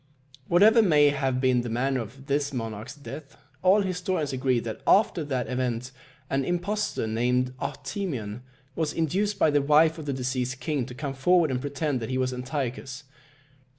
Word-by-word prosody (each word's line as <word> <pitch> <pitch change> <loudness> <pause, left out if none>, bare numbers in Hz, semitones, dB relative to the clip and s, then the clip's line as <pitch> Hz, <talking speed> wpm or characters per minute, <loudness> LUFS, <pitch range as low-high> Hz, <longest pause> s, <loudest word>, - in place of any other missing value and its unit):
Whatever 215 +6 +6
may 150 -8 +5
have 135 -3 0
been 130 -2 +3
the 120 - -5
manner 130 +3 0
of 135 +5 -10
this 140 0 0
monarch's 115 -4 -5
death, 145 0 -10 0.2
all 190 +3 +5
historians 180 -6 -2
agree 130 -1 +1
that 115 -1 -6
after 195 -5 +4
that 130 -4 -2
event 125 -1 -2 0.4
an 135 0 0
impostor 180 - -1
named 125 +3 0
Artemion 125 - -4 0.3
was 160 -2 -1
induced 195 +6 0
by 160 - +3
the 145 0 +3
wife 155 +3 +4
of 150 - -8
the 140 - 0
deceased 130 0 -2
king 145 -6 -2
to 125 - -9
come 140 0 -4
forward 160 +3 +3
and 125 -1 -1
pretend 145 -1 -2
that 115 - -5
he 130 - -1
was 130 0 0
Antiochus. 130 +1 -4
140 Hz, 170 wpm, -26 LUFS, 125-160 Hz, 0.4 s, Whatever